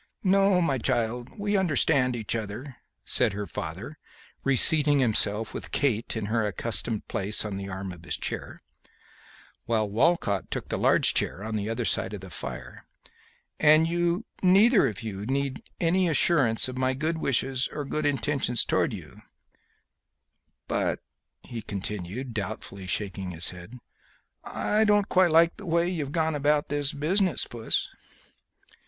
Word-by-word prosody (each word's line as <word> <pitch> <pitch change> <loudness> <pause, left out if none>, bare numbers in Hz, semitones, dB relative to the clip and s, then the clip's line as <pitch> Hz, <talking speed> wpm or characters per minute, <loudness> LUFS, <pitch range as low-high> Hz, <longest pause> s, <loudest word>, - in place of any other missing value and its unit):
"No, 185 -6 +3
child, 120 0 -1
we 205 0 -1
understand 145 -8 +2
each 110 -1 -2
other," 115 +5 -6 0.3
said 105 - +1
her 105 +1 -4
father, 95 - -7 0.4
reseating 145 +2 +7
himself, 110 -3 +1
with - - -7
Kate 120 -6 0
in 110 - -3
her 110 +2 0
accustomed 110 +2 -3
place 105 +3 -2
on 105 -2 -4
the 100 0 -6
arm 95 0 -5
of 90 -2 -12
his 85 - -3
chair, - - -6 1.0
while 110 -2 +1
Walcott 105 - +1
took - - -5
the - - -2
large - - +4
chair 100 - 0
on 110 0 -4
the 105 0 -2
other 115 +1 -2
side - - 0
of 100 - -9
the 95 -1 -11
fire; - - -8 0.7
"and 155 +2 +5
you 175 +4 0 0.2
neither 195 - +5
of 115 +1 -6
you 105 -1 -5
need 135 0 -2 0.2
any 180 +2 +2
assurance 145 -9 +3
of 130 0 -6
my 130 0 +1
good 160 +4 -2
wishes 130 -2 0
or 145 -1 -5
good 155 +2 -1
intentions 135 -3 0
towards - - 0
you; - - -12 1.5
but," - - -1 0.4
he 115 -2 -7
continued, 105 +5 -6
doubtfully, 100 -2 -6
shaking 95 -1 -3
his 85 -1 -1
head, 90 +7 -11 0.7
"I 215 +1 0
don't 205 -1 +3
quite 185 -1 +4
like 165 +1 +4
the 205 - -10
way 170 +1 +2
you've 155 -6 -3
gone 160 0 0
about 145 0 +1
this 145 -1 -1
business, 180 +4 0
Puss." 115 -2 -2
130 Hz, 150 wpm, -26 LUFS, 105-160 Hz, 1.5 s, reseating